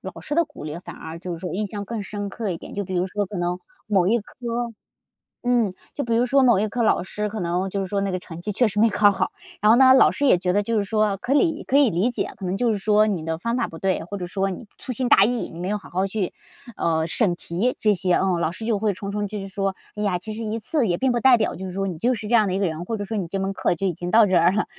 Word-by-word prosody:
老 - - -8
师 295 - -4
的 335 - +4
鼓 300 - -13
励 155 +2 -5
反 - - -10
而 160 +1 -8
就 180 +1 -6
是 170 - -5
说 180 -1 -5
印 210 +3 -1
象 205 0 -6
更 225 +1 -4
深 205 0 -5
刻 215 +1 -4
一 170 - -2
点。 - - -11
就 205 0 -2
比 185 - -5
如 180 +1 +1
说 205 +1 -2
可 200 - -7
能 175 0 -1 0.3
某 190 -4 +3
一 230 +4 +3
科 235 +2 -5 0.8
嗯， 235 -6 +2 0.2
就 285 - -3
比 230 -1 0
如 240 +2 +3
说 275 +2 +3
某 240 -6 +5
一 215 - +1
科 235 +3 -2
老 215 - +2
师， 210 +2 -3
可 215 +1 -5
能 180 +2 -1
就 200 - -3
是 195 - -1
说 200 +1 -1
那 200 - -1
个 185 - -1
成 170 -2 -9
绩 210 +4 -3
确 240 +3 +3
实 210 0 -2
没 225 +1 +5
考 205 0 +4
好， 195 - -1 0.3
然 210 - +4
后 - - +7
呢 260 0 +8
老 260 - +7
师 285 - -1
也 220 -10 +5
觉 180 0 0
得 205 - +2
就 230 +2 -1
是 205 - +2
说 210 -1 +1
可以 295 - +1
可 275 - +2
以 280 -6 +5
理 185 +9 +1
解， 240 - -3
可 195 - -7
能 185 +2 -1
就 235 +1 +2
是 205 - -2
说 210 +1 +4
你 190 -7 -1
的 160 0 -2
方 230 +7 -2
法 245 -2 0
不 165 - -10
对， 190 -1 0
或 200 +4 -6
者 180 - -4
说 195 +2 -1
你 195 +5 -7
粗 260 - -5
心 250 +1 0
大 195 - +7
意， 240 +2 0
你 165 - -9
没 180 - -3
有 210 - 0
好 205 - -14
好 185 +2 0
去， 195 -2 -2 0.4
呃， 160 -1 +1
审 175 +2 +1
题 185 +9 -1
这 210 -1 +3
些。 180 -1 +1
嗯， 185 -2 +1
老 165 - 0
师 220 - -7
就 220 -3 +1
会 215 0 +1
重 200 +2 -6
重 205 0 -2
继 210 +1 -5
续 195 - -6
说： 195 0 -2 0.2
“哎 210 - -6
呀， 200 -4 +1
其 215 +5 -6
实 225 +2 -5
一 220 0 -2
次 235 +2 0
也 175 - +1
并 265 +4 +1
不 240 - +1
代 250 0 +6
表 215 - 0
就 190 - -7
是 185 - -5
说 195 +2 -2
你 180 -5 -4
就 245 +2 +2
是 215 -1 -6
这 235 - -2
样 220 -3 +5
的 185 - -1
一 - - 0
个 195 - +1
人， 160 -1 -3
或 225 +5 -3
者 205 - -4
说 220 - -4
你 195 -5 -2
这 195 +3 -3
门 195 0 -2
课 180 - 0
就 195 - -3
已 185 - +1
经 175 +2 -5
到 220 +3 +6
这 190 -2 +1
儿 170 +1 +5
了。” 215 - +1
205 Hz, 350 characters per minute, -23 LUFS, 185-225 Hz, 0.8 s, 呢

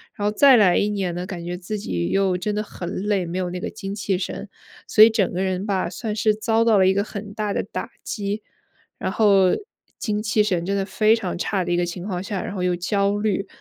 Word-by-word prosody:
然 205 - -1
后 210 - +1
再 270 -1 +7
来 185 -5 +5
一 205 - +2
年 195 -4 -2
呢， 180 - -4
感 175 -3 -6
觉 175 - -3
自 195 +4 -5
己 85 - -2
又 195 -2 +2
真 210 +3 -2
的 210 - -1
很 175 -4 -7
累， 205 -3 0
没 170 +2 -4
有 180 -1 -1
那 180 - -4
个 - - -4
精 195 0 -6
气 195 -2 -1
神， 195 +2 -5 0.4
所 215 - +4
以 225 - +8
整 210 -4 +1
个 180 - -1
人 190 +1 -1
吧， 190 -4 0
算 215 +2 -4
是 215 0 +2
遭 225 +1 +1
到 225 -2 +5
了 190 -1 +5
一 190 - +4
个 200 +1 +1
很 205 -1 -7
大 210 -1 -2
的 - - 0
打 - - -6
击， 205 0 -3 0.6
然 - - -2
后 195 -3 +4 0.5
精 210 -2 -1
气 215 -1 +2
神 180 -5 -1
真 200 - -1
的 195 - 0
非 215 +3 +3
常 185 -6 -4
差 190 +1 -1
的 175 - -3
一 175 - +2
个 175 - +1
情 175 +1 -6
况 180 -2 -3
下， 195 -1 -3
然 200 - -5
后 185 - -2
又 180 -1 +1
焦 200 +3 0
虑。 205 -2 -1
200 Hz, 275 characters per minute, -23 LUFS, 180-210 Hz, 0.6 s, 以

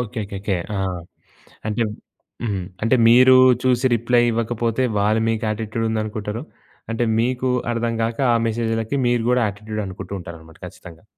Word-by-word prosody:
Okay. 115 -1 -4
Okay. 100 - -7
Okay. 100 -2 -1 0.2
ఆ! - - -1 0.9
అంటే 115 +2 0 0.6
హ్మ్. 100 -5 -2 0.2
అంటే 115 +3 +3
మీరు 130 +2 +7 0.3
చూసి 130 0 +2
రిప్లై 120 +1 +2
ఇవ్వకపోతే, 115 +1 -1 0.2
వాళ్ళు 110 +2 +2
మీకు 115 0 -1
యాటిట్యూడుందనుకుంటరు. 110 0 -3 0.5
అంటే 115 +1 0 0.2
మీకు 125 +2 0 0.2
అర్థం 115 0 -1
కాక, 115 0 -2 0.2
ఆ - - +3
మెసేజ్‌లకి 115 +2 -1
మీరు 120 -1 +1
కూడా 125 0 +3
యాటిట్యూడనుకుంటూ 100 -1 -6
ఉంటారనమాట 80 -2 -11
ఖచ్చితంగా. 85 +1 -12
115 Hz, 135 wpm, -21 LUFS, 105-120 Hz, 0.9 s, మీరు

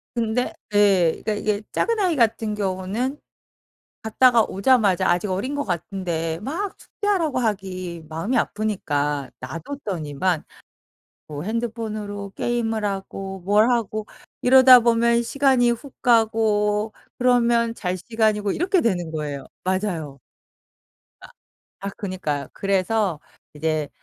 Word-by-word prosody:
근데 230 +1 0 0.2
예. 195 -5 +4
그니까 215 - 0
이게 210 0 -1
작은 460 -1 0
아이 360 -5 +2
같은 225 -2 +1
경우는 205 +7 -2 0.9
갔다가 230 +1 +4
오자마자 200 -2 +2
아직 175 +3 +1
어린 210 +10 -2
것 285 - -1
같은데 170 -3 -3
막 345 - -3
숙제하라고 360 -10 -1
하기 185 -6 -3
마음이 165 +11 -1
아프니까 145 - -1
놔 130 +6 -6
뒀더니만 175 - -3 0.8
뭐 150 -1 -6
핸드폰으로 215 -2 -4
게임을 225 -2 -1
하고 195 -1 -4
뭘 210 +4 +4
하고 215 -3 -1 0.3
이러다 260 0 +8
보면 235 0 +3
시간이 255 -1 +3
훅 245 +3 -7
가고 220 -3 +2 0.3
그러면 235 -2 +3
잘 180 -4 -2
시간이고 215 0 0
이렇게 360 - +1
되는 175 - 0
거예요. 145 -3 -4 0.2
맞아요. 180 -7 -2 1.0
아 - - -11 0.6
아 200 - -2
그니까요. 180 -8 -3
그래서 195 -2 0 0.4
이제 155 -1 -1
210 Hz, 265 characters per minute, -23 LUFS, 185-235 Hz, 1.0 s, 이러다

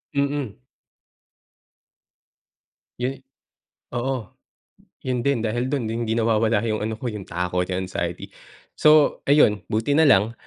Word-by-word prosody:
Mm. 140 -6 -1 2.4
Yun 130 +2 -2 0.8
oo. 125 -4 -3 0.7
Yun 125 -1 -1
din 120 -2 0
dahil 120 +3 -1
dun 135 -3 -1
hindi 115 0 -2
nawawala 110 -1 +2
yung 110 -2 -1
ano 110 +1 -3
ko 120 - -6
yung 100 -3 -8
takot, 90 +1 -2
yung 95 0 -2
anxiety. 85 -2 -4 0.4
So 150 -1 +4
ayun, 140 -8 +5
buti 110 +6 0
na 160 0 +5
lang, 110 -2 +4
115 Hz, 120 wpm, -23 LUFS, 105-135 Hz, 2.4 s, ayun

